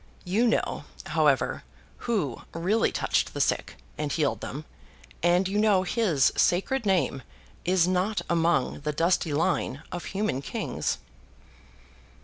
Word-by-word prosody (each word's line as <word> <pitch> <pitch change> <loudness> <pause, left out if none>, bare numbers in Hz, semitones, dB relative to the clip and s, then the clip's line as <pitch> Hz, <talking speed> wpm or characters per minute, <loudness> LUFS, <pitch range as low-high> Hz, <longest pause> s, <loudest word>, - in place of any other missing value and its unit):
You 210 +7 +2
know, 225 - 0 0.2
however, - - +1 0.5
Who 175 - 0
really 190 +7 +1
touched - - 0
the - - -3
sick, - - 0 0.2
and 150 -1 -2
healed 150 -2 0
them; 150 +3 -6 0.6
and 175 +2 +3
you 200 +2 0
know 205 -3 +4
His 185 - +2
sacred 215 +6 +1
name 155 -8 +1 0.4
is 180 -1 +3
not 185 +4 0
among 165 -5 +1
the 150 +1 -3
dusty 165 +1 +1
line 145 -2 0
of 175 - -5
human 195 -9 -1
kings. - - -2
175 Hz, 130 wpm, -27 LUFS, 150-195 Hz, 0.6 s, know